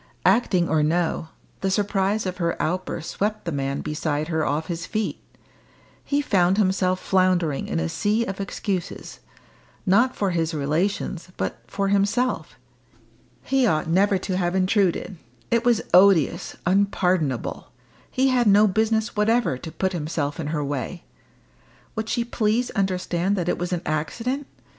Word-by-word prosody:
Acting 185 -7 +3
or 160 -2 +2
no, 165 +1 0 0.3
the 195 - 0
surprise 200 +1 0
of 185 -1 -3
her 170 -2 -1
outburst 175 -1 -2
swept 210 0 -2
the 170 - -2
man 140 -1 -2
beside 150 0 -2
her 160 -2 0
off 150 +3 -1
his 170 -1 -5
feet. 215 -1 -2 0.8
He 285 0 0
found 185 -6 +3
himself 185 -2 +2
floundering 185 -7 +1
in 80 - -1
a 80 - -1
sea 210 - 0
of 195 -1 -4
excuses 195 - -4 0.7
not 235 +7 +3
for 200 -2 0
his 165 -1 -1
relations, 170 +4 -1
but - - -3
for 195 0 -1
himself. 200 0 0 0.9
He 265 -2 +2
ought 155 -5 +1
never 195 +4 +3
to 185 0 -3
have 175 -1 0
intruded; 190 -1 +1 0.3
it 235 0 +3
was 240 -3 +3
odious, 180 -5 +4
unpardonable; 180 - 0 0.4
he 265 +1 +2
had 245 -3 +2
no 205 +1 +6
business 220 +3 0
whatever 225 - +2
to 160 - -8
put 190 +3 -1
himself 150 -3 -2
in 155 - -3
her 150 -1 -1
way! 140 -2 -4 0.9
Would 220 0 -3
she 235 -1 0
please 235 +1 0
understand 190 -2 0
that 175 -3 -2
it - - 0
was 175 +1 -3
an 175 -1 -2
accident? 230 - -2
185 Hz, 150 wpm, -24 LUFS, 165-210 Hz, 0.9 s, no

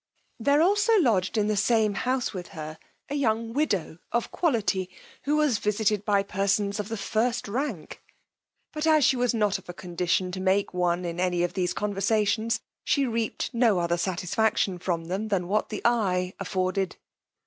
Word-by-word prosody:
There 285 +6 +3
also 415 +4 +4
lodged 220 - +2
in 210 - +2
the 215 0 +1
same 215 0 +2
house 255 +4 -1
with 180 -3 -6
her 155 0 -6 0.3
a - - -5
young 230 -5 0
widow 200 - -1
of 235 0 -1
quality, 210 - 0 0.4
who 295 +2 +2
was 295 -8 +2
visited 210 -1 +1
by 200 -2 +3
persons 200 +1 0
of 210 0 -4
the 225 - -3
first 235 +3 -1
rank; 225 - -4 0.7
but 305 0 -2
as 310 -4 +5
she - - +4
was 245 -1 +1
not 210 -3 +1
of 185 - -19
a 175 - -6
condition 180 +1 -1
to 185 - -5
make 190 +1 +1
one 180 0 0
in 170 0 -4
any 180 -1 +1
of 175 - -1
these 180 -2 0
conversations, 210 +2 0 0.2
she 280 -2 +2
reaped 230 -2 -2
no 230 -4 +3
other 170 0 +1
satisfaction 185 +2 0
from 170 -2 -2
them 190 +6 -3
than 190 -4 -1
what 210 +3 0
the 210 - -5
eye 190 -6 +1
afforded. 185 -1 -1
205 Hz, 175 wpm, -26 LUFS, 185-235 Hz, 0.7 s, as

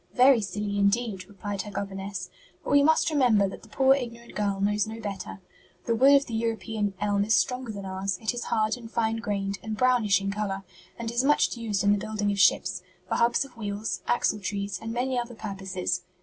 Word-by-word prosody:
"Very 255 -1 +6
silly 205 0 -3
indeed," 200 -2 +1
replied 205 0 -4
her 210 - -8
governess; 195 -1 -5 0.3
"but - - -4
we 285 0 +6
must 315 +2 +3
remember 240 -9 +4
that 195 - -8
the - - -16
poor 265 0 +4
ignorant 235 -3 -5
girl 200 -2 -1
knows 205 +2 +1
no 220 +1 -7
better. 200 -2 -6 0.4
The 230 - +1
wood 270 +5 +6
of 280 0 +4
the 230 - -8
European 225 -2 -2
elm 205 -1 +1
is 215 +2 +3
stronger 250 -2 0
than 200 -2 -7
ours; 190 0 -2
it 220 +2 -1
is 240 - -4
hard 220 +1 +1
and 230 -2 -10
fine 225 -1 0
grained, 200 -3 -2
and 220 -1 -5
brownish 240 -6 +3
in 195 0 -2
color, 200 -1 -3 0.3
and 230 -1 -4
is 240 +2 +1
much 295 -1 +3
used 215 -4 -2
in 205 - +4
the 205 - +3
building 210 -1 -1
of 200 - -2
ships, 180 -1 +3 0.3
for - - -2
hubs 235 +4 +2
of 270 - -16
wheels, 210 -1 -3
axletrees 200 -4 -1
and 225 0 -5
many 250 +2 0
other 240 0 -5
purposes. 190 -4 -3
210 Hz, 205 wpm, -27 LUFS, 200-235 Hz, 0.4 s, Very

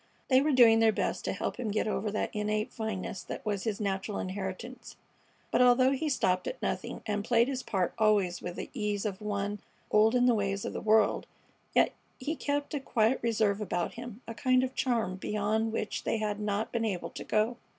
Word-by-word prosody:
They 260 0 +6
were 300 +2 +2
doing 235 -4 +7
their 225 -1 +5
best - - -2
to - - 0
help - - -3
him 245 -3 -3
get 215 +1 0
over 210 0 -1
that 215 - -2
innate 210 +1 -1
fineness 205 -4 -4
that - - -7
was 205 -1 -2
his 215 -3 -1
natural 200 0 -2
inheritance, 190 +6 -5 0.6
but - - +3
although 250 +1 +6
he 295 +3 -1
stopped 185 -9 +1
at - - -4
nothing, - - -3
and 205 -1 -1
played 235 +1 +3
his 265 -1 -2
part 190 -7 -1
always 205 -5 +2
with 175 0 -5
the - - -6
ease 210 -5 -2
of 205 -1 -3
one 205 0 -2 0.3
old 220 +3 +5
in 245 0 +4
the 245 - +5
ways 200 -2 -1
of - - -4
the - - -4
world, 220 -1 +3 0.5
yet - - +4 0.3
he 295 +5 -2
kept 285 0 -2
a 295 - 0
quiet 245 -2 +1
reserve 215 -3 +1
about 175 -4 -2
him, 240 -1 -8
a 230 - -5
kind 255 +3 +2
of 260 0 -2
charm 230 -8 0
beyond 215 +3 0
which 215 -2 -3
they - - 0
had 210 -1 -2
not 210 +1 -1
been 235 -1 -1
able 195 -6 -2
to - - -7
go. 220 +3 +1
215 Hz, 210 wpm, -30 LUFS, 205-245 Hz, 0.6 s, doing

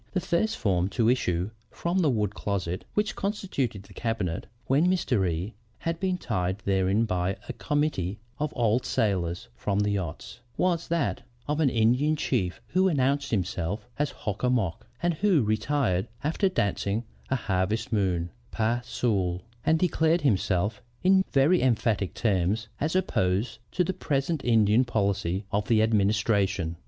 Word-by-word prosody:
"The 190 - +2
first 185 +5 0
form 95 -2 +1
to 115 -1 +4
issue 90 -6 0 0.2
from 175 +2 -1
the 165 -5 +3
wood 105 -5 0
closet 95 -3 -3
which 210 0 0
constituted 160 - -2
the 100 - -16
cabinet, 105 -6 -2 0.2
when 145 +8 +3
Mr. 125 - +2
E 85 +6 -3 0.2
had 165 0 -3
been 185 -1 0
tied 95 - -1
therein 95 +3 +2
by 95 -2 -1
a - - -4
committee 145 - -1 0.2
of 150 0 -1
old 120 0 +2
sailors 90 - 0
from 100 -1 -1
the 105 0 +1
yachts, 90 -7 -4 0.2
was 175 -2 +1
that 165 -7 0 0.3
of 150 +1 0
an 150 -4 +4
Indian 125 +7 +3
chief 105 -11 -1
who 185 +2 +3
announced 140 -3 +1
himself 100 0 -2
as 150 -1 +1
Hock 105 -5 -5
a 125 - +2
mock, 110 -10 -1 0.2
and 175 0 +3
who 175 - +3
retired 110 -3 +1 0.2
after 165 +6 +1
dancing 100 - 0 0.3
a 130 - +2
'Harvest 105 0 -1
Moon' 90 -5 0 0.2
pas 115 +2 0
seul, 95 -6 0 0.2
and 160 - +3
declaring 165 -1 +2
himself 105 -3 +1 0.2
in 190 +1 +5
very 145 +6 +4
emphatic 110 -6 +1
terms, 105 0 0
as 155 +4 -1
opposed 105 - 0
to 180 - +2
the 185 - -1
present 145 -3 -1
Indian 110 0 +4
policy 100 -5 -1
of 105 0 0
the 110 -2 +4
Administration. 100 -5 +1
110 Hz, 155 wpm, -27 LUFS, 95-150 Hz, 0.3 s, in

